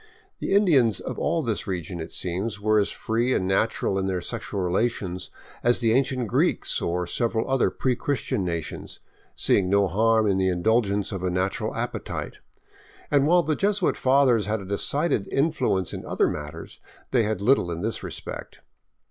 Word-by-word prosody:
The -, -, -2 dB
Indians 140 Hz, -, +4 dB
of -, -, -6 dB
all 165 Hz, -, 0 dB
this 110 Hz, -3 st, -2 dB
region, 90 Hz, -2 st, -4 dB
it 80 Hz, -, -6 dB
seems, 95 Hz, +4 st, -2 dB
were 110 Hz, +1 st, +3 dB
as 100 Hz, -, +1 dB
free 120 Hz, +3 st, 0 dB
and 95 Hz, -, 0 dB
natural 95 Hz, 0 st, +1 dB
in 95 Hz, -, -1 dB
their 95 Hz, -1 st, -1 dB
sexual 105 Hz, +1 st, -5 dB
relations 95 Hz, 0 st, -1 dB, 0.3 s
as 120 Hz, 0 st, +3 dB
the 115 Hz, -2 st, +2 dB
ancient 130 Hz, -2 st, +1 dB
Greeks -, -, +1 dB
or 90 Hz, +1 st, -1 dB
several 115 Hz, +4 st, -1 dB
other 135 Hz, -1 st, +2 dB
pre 130 Hz, -2 st, -1 dB
Chris 140 Hz, 0 st, -2 dB
tian 100 Hz, -, -2 dB
nations, 85 Hz, -3 st, -5 dB, 0.4 s
seeing 95 Hz, -2 st, +2 dB
no 100 Hz, 0 st, +3 dB
harm 110 Hz, +4 st, +3 dB
in 95 Hz, -2 st, +2 dB
the 95 Hz, 0 st, +2 dB
indulgence 100 Hz, +2 st, +1 dB
of 95 Hz, -3 st, -4 dB
a 90 Hz, -, 0 dB
natural 90 Hz, +2 st, -1 dB
appetite; -, -, -4 dB, 0.7 s
and 145 Hz, -1 st, +4 dB
while 175 Hz, +1 st, +5 dB
the 155 Hz, -1 st, 0 dB
Jesuit 200 Hz, 0 st, +1 dB
fathers 130 Hz, -5 st, +3 dB
had 110 Hz, +1 st, 0 dB
a 100 Hz, -, -8 dB
decided 105 Hz, -, 0 dB
influence 135 Hz, -, 0 dB
in -, -, -6 dB
other -, -, +1 dB
matters, 75 Hz, +2 st, -6 dB, 0.3 s
they 125 Hz, -, +3 dB
had 110 Hz, -3 st, -1 dB
little 100 Hz, -4 st, +3 dB
in 85 Hz, 0 st, -4 dB
this 115 Hz, +1 st, -2 dB
respect. -, -, -7 dB
110 Hz, 175 wpm, -25 LUFS, 95-125 Hz, 0.7 s, while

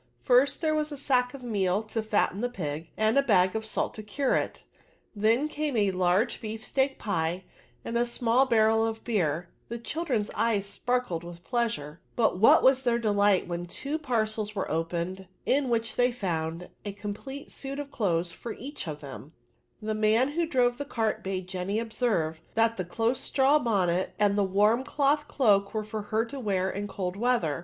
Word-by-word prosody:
First, 260 Hz, +4 st, +4 dB
there 315 Hz, -2 st, +2 dB
was 305 Hz, 0 st, -1 dB
a 290 Hz, -, -5 dB
sack 255 Hz, -2 st, +1 dB
of 265 Hz, -, -10 dB
meal 200 Hz, -3 st, 0 dB
to 220 Hz, +1 st, -3 dB
fatten 210 Hz, -2 st, 0 dB
the 245 Hz, -, 0 dB
pig, 160 Hz, -7 st, -5 dB
and 220 Hz, +5 st, +3 dB
a -, -, +6 dB
bag 185 Hz, -7 st, +3 dB
of 220 Hz, -, -1 dB
salt 220 Hz, -, -2 dB
to 215 Hz, -, -7 dB
cure 255 Hz, +6 st, 0 dB
it; -, -, -2 dB, 0.5 s
then 225 Hz, +7 st, +2 dB
came 300 Hz, -4 st, -2 dB
a 205 Hz, -2 st, +3 dB
large 185 Hz, +5 st, +1 dB
beef 220 Hz, -1 st, -5 dB
steak 270 Hz, 0 st, 0 dB
pie, 175 Hz, -3 st, -1 dB, 0.4 s
and 230 Hz, -, -4 dB
a 235 Hz, -, +3 dB
small 240 Hz, +2 st, +2 dB
barrel 225 Hz, -1 st, +4 dB
of 225 Hz, 0 st, -2 dB
beer: 170 Hz, -7 st, 0 dB, 0.2 s
the 235 Hz, -, -3 dB
children's 235 Hz, -4 st, -2 dB
eyes 215 Hz, -4 st, +1 dB
sparkled 225 Hz, -4 st, -1 dB
with 170 Hz, 0 st, -10 dB
pleasure; 195 Hz, -, -2 dB
but 220 Hz, -6 st, +2 dB
what 220 Hz, -, +7 dB
was 265 Hz, 0 st, +5 dB
their 240 Hz, -3 st, +2 dB
delight 205 Hz, -4 st, +2 dB
when 175 Hz, 0 st, -4 dB
two 285 Hz, -, -3 dB
parcels 220 Hz, -6 st, -1 dB
were 195 Hz, -, -2 dB
opened, 170 Hz, +3 st, -2 dB, 0.2 s
in 275 Hz, -1 st, +2 dB
which 225 Hz, -1 st, 0 dB
they 245 Hz, 0 st, +3 dB
found 170 Hz, -6 st, -3 dB
a 205 Hz, -, -5 dB
complete 210 Hz, +8 st, -7 dB
suit 275 Hz, 0 st, -5 dB
of 285 Hz, -1 st, -6 dB
clothes 175 Hz, -6 st, 0 dB
for 220 Hz, +7 st, -7 dB
each 275 Hz, -, -7 dB
of 150 Hz, -1 st, -5 dB
them 140 Hz, +1 st, -9 dB
I 120 Hz, -, -20 dB
The 215 Hz, -, 0 dB
man 220 Hz, +5 st, +3 dB
who 330 Hz, +3 st, -1 dB
drove 245 Hz, -5 st, +2 dB
the -, -, -1 dB
cart 225 Hz, -6 st, -1 dB
bade 190 Hz, -1 st, -3 dB
Jenny 190 Hz, +2 st, -2 dB
observe, 215 Hz, -9 st, -1 dB
that 225 Hz, 0 st, +3 dB
the 185 Hz, -, -3 dB
close 225 Hz, +7 st, 0 dB
straw^bonnet, 225 Hz, -, +2 dB
and 205 Hz, -1 st, +3 dB
the 205 Hz, -, +3 dB
warm 210 Hz, +6 st, +3 dB
cloth 290 Hz, +1 st, +1 dB
cloak, 205 Hz, -6 st, +2 dB
were 215 Hz, -, 0 dB
for 215 Hz, 0 st, -5 dB
her 220 Hz, +2 st, 0 dB
to 270 Hz, +4 st, -7 dB
wear 190 Hz, -5 st, 0 dB
in 205 Hz, +1 st, -4 dB
cold 185 Hz, -2 st, -4 dB
weather. 210 Hz, -, +1 dB
220 Hz, 190 wpm, -28 LUFS, 185-245 Hz, 0.5 s, what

